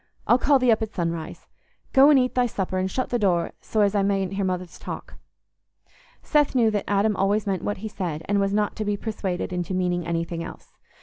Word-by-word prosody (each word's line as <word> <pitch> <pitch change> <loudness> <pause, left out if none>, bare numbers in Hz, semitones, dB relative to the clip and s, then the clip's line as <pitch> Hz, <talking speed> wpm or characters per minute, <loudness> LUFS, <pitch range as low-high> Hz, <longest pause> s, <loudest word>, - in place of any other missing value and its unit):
I'll 240 - +4
call 285 +1 +4
thee 255 -2 +3
up 220 - +2
at 220 0 -4
sunrise. 165 -2 -4 0.5
Go 270 +2 +7
and 295 - +6
eat 255 -1 +2
thy 250 -1 +2
supper, 190 -4 -2
and 185 +1 -1
shut 255 +7 -2
the 240 - +1
door 180 -5 +1
so 215 - -1
as 200 -1 +3
I 205 - +2
mayn't 195 -1 0
hear 195 0 -1
Mother's 185 -2 -3
talk." - - -7 1.1
Seth 295 -3 +2
knew 230 -3 +4
that 205 -2 -2
Adam 205 +1 +2
always 200 +2 +1
meant 195 -2 -1
what 205 - -2
he - - -1
said, 170 -7 -4
and 205 0 +1
was 195 0 +1
not 210 0 0
to 215 - -2
be 205 -1 -1
persuaded 195 -5 -3
into 180 +1 -2
meaning 180 -2 -1
anything 170 0 -2
else. - - -11
200 Hz, 225 wpm, -24 LUFS, 180-220 Hz, 1.1 s, Go